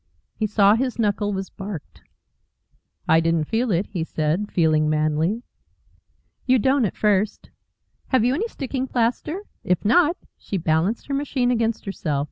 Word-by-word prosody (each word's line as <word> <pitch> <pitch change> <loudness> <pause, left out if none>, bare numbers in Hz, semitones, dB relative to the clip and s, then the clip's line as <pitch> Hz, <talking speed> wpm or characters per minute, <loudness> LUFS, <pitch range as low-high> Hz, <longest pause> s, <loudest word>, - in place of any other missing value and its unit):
He 215 - -1
saw 205 -1 +5
his 250 +2 -1
knuckle 205 -2 0
was 190 -1 -4
barked. 195 -5 -8 1.1
"I 160 - +5
didn't 165 -1 +1
feel 230 +9 -1
it," 185 0 +1
he 180 -6 -4
said, 160 +6 -1
feeling 155 -3 +2
manly. 155 +8 0 1.0
"You 255 0 +5
don't 265 +1 +2
at 195 - -4
first. 210 0 0 0.6
Have 255 -4 +2
you 250 - +3
any 400 +11 -1
sticking 265 - -4
plaster? 255 - -1 0.2
If 180 +2 0
not 335 - +4
" - - -56
She 200 - -4
balanced 165 +6 0
her 280 - -4
machine 275 -3 0
against 230 -2 0
herself. 155 -7 -2
210 Hz, 155 wpm, -23 LUFS, 170-250 Hz, 1.1 s, saw